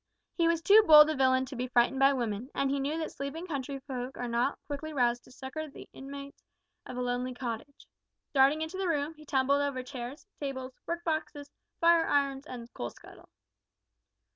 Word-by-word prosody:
He 335 Hz, -2 st, +2 dB
was 335 Hz, -1 st, +1 dB
too 420 Hz, +5 st, +8 dB
bold 305 Hz, 0 st, +9 dB
a -, -, -2 dB
villain 260 Hz, -1 st, +3 dB
to 265 Hz, +1 st, -8 dB
be 250 Hz, +1 st, -2 dB
frightened 245 Hz, +2 st, +2 dB
by 270 Hz, +1 st, +6 dB
women, 240 Hz, -2 st, -2 dB
and 275 Hz, -1 st, +1 dB
he 280 Hz, -, 0 dB
knew 285 Hz, +4 st, -1 dB
that 320 Hz, -1 st, -3 dB
sleeping 280 Hz, +5 st, -5 dB
country 280 Hz, -4 st, -4 dB
folk 255 Hz, 0 st, -5 dB
are 245 Hz, -, -3 dB
not 240 Hz, +4 st, 0 dB
quickly 305 Hz, +2 st, -5 dB
roused 245 Hz, -3 st, +1 dB
to -, -, -17 dB
succour 275 Hz, +5 st, -6 dB
the -, -, -12 dB
inmates 280 Hz, +1 st, -9 dB, 0.5 s
of 250 Hz, -, -7 dB
a -, -, -1 dB
lonely 250 Hz, +1 st, -2 dB
cottage. 245 Hz, +2 st, -6 dB, 0.5 s
Darting 280 Hz, +3 st, +4 dB
into 320 Hz, +4 st, -5 dB
the 385 Hz, -, 0 dB
room, 300 Hz, -1 st, 0 dB
he 305 Hz, -1 st, -16 dB
tumbled 280 Hz, +1 st, +2 dB
over 280 Hz, -3 st, -2 dB
chairs, 255 Hz, +2 st, -7 dB
tables, 260 Hz, -2 st, -5 dB
work 340 Hz, 0 st, -3 dB
boxes, 310 Hz, -3 st, -3 dB, 0.3 s
fire 335 Hz, -1 st, +5 dB
irons, 280 Hz, 0 st, +1 dB
and 240 Hz, -2 st, -9 dB
coal 120 Hz, -, -4 dB
scuttle. -, -, -16 dB
275 Hz, 190 wpm, -30 LUFS, 255-305 Hz, 0.5 s, bold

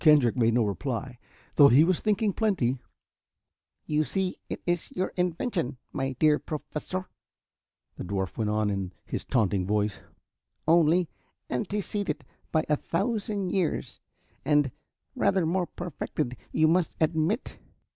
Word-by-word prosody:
Kendrick 145 Hz, -7 st, +6 dB
made 115 Hz, -2 st, +3 dB
no 120 Hz, -, +4 dB
reply, 120 Hz, +3 st, -3 dB, 0.4 s
though 145 Hz, -, +10 dB
he 140 Hz, +3 st, +7 dB
was 180 Hz, +1 st, +2 dB
thinking 210 Hz, -1 st, +1 dB
plenty. 165 Hz, -, +1 dB, 1.1 s
"You 155 Hz, 0 st, +2 dB
see, 190 Hz, +3 st, -2 dB
it -, -, -3 dB
is 175 Hz, -1 st, 0 dB
your 185 Hz, +1 st, -1 dB
invention, 180 Hz, -, -1 dB, 0.2 s
my 135 Hz, 0 st, -1 dB
dear 150 Hz, +3 st, +4 dB
Professor," 160 Hz, +4 st, -5 dB, 0.9 s
the -, -, -5 dB
dwarf 95 Hz, 0 st, -2 dB
went 110 Hz, -2 st, 0 dB
on 105 Hz, -1 st, +1 dB
in 95 Hz, -2 st, -3 dB
his -, -, -4 dB
taunting 100 Hz, -7 st, +1 dB
voice, 105 Hz, 0 st, 0 dB, 0.7 s
"only 170 Hz, +1 st, +5 dB, 0.4 s
anteceded 185 Hz, -, -2 dB, 0.3 s
by 155 Hz, 0 st, +2 dB
a 150 Hz, -, +2 dB
thousand 200 Hz, +1 st, -1 dB
years 180 Hz, -5 st, -1 dB, 0.4 s
and 145 Hz, -3 st, +3 dB, 0.4 s
rather 190 Hz, -3 st, +2 dB
more 175 Hz, +2 st, +1 dB
perfected, 155 Hz, -6 st, -4 dB, 0.2 s
you 155 Hz, -, +4 dB
must 170 Hz, +1 st, +2 dB
admit." 160 Hz, -, 0 dB
155 Hz, 130 wpm, -28 LUFS, 125-180 Hz, 1.1 s, though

